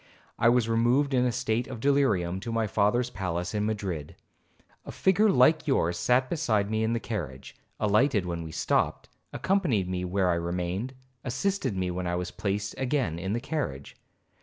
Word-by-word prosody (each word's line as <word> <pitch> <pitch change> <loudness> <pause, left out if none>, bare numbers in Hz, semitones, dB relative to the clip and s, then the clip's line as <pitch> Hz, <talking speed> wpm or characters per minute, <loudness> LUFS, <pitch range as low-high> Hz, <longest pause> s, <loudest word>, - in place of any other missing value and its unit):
I 115 - +5
was 120 -2 +3
removed 120 +5 +2
in 125 -1 +3
a 125 - +2
state 120 -1 -1
of 130 -3 -7
delirium 110 -10 +2
to 115 +4 -5
my 115 -1 +1
father's 110 +4 +1
palace 90 -2 -3
in 105 0 0
Madrid. 95 -9 -4 0.7
A - - -8
figure 200 +3 +3
like 155 +1 +4
yours 85 - +2
sat 125 +1 +3
beside 110 -10 0
me 110 0 +1
in 110 +1 +1
the 115 - 0
carriage, 75 - -6 0.2
alighted 105 0 +2
when 85 -1 -3
we 80 -1 -7
stopped, - - 0 0.2
accompanied 165 - +1
me 90 0 -2
where 90 0 +1
I - - +2
remained, 90 +8 -3 0.3
assisted 130 - -1
me 90 -1 -1
when 90 0 -3
I 90 - -1
was 90 0 -3
placed 100 +1 -2
again 130 - 0
in 95 +3 -2
the 120 - 0
carriage. 120 - -4
110 Hz, 180 wpm, -27 LUFS, 90-125 Hz, 0.7 s, I